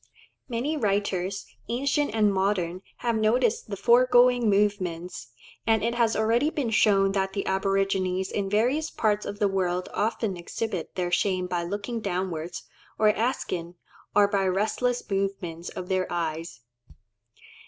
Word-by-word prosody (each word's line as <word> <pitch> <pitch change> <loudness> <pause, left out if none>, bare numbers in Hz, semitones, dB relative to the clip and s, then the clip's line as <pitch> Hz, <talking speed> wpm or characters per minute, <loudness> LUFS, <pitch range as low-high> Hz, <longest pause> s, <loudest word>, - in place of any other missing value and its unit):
Many 255 +6 -1
writers, 200 -4 -1 0.2
ancient 270 +1 0
and 210 -2 +3
modern, 190 -2 0 0.2
have 235 -1 +2
noticed 220 +1 +1
the 200 - -4
foregoing 245 +2 +5
movements; 185 - 0 0.4
and 220 -2 +3
it 235 +1 +1
has 235 -2 +2
already 230 +7 +2
been 275 -8 -2
shown 195 -3 +4
that 195 -1 -1
the 200 - -2
aborigines 190 -1 0
in 200 -2 -2
various 250 +10 +1
parts 210 -5 0
of 205 - -5
the 205 - +2
world 185 -2 -1
often 220 -3 -1
exhibit 185 +1 -4
their 180 -1 -1
shame 185 0 +1
by 180 -1 -2
looking 205 +6 -4
downwards 175 -3 -3 0.3
or 215 0 +4
askant, 185 -7 -1 0.4
or 205 -1 +6
by 200 -2 +1
restless 220 +6 0
movements 195 -4 -3
of 180 - -7
their 185 0 -1
eyes. 165 -5 -3
200 Hz, 140 wpm, -26 LUFS, 185-225 Hz, 0.4 s, or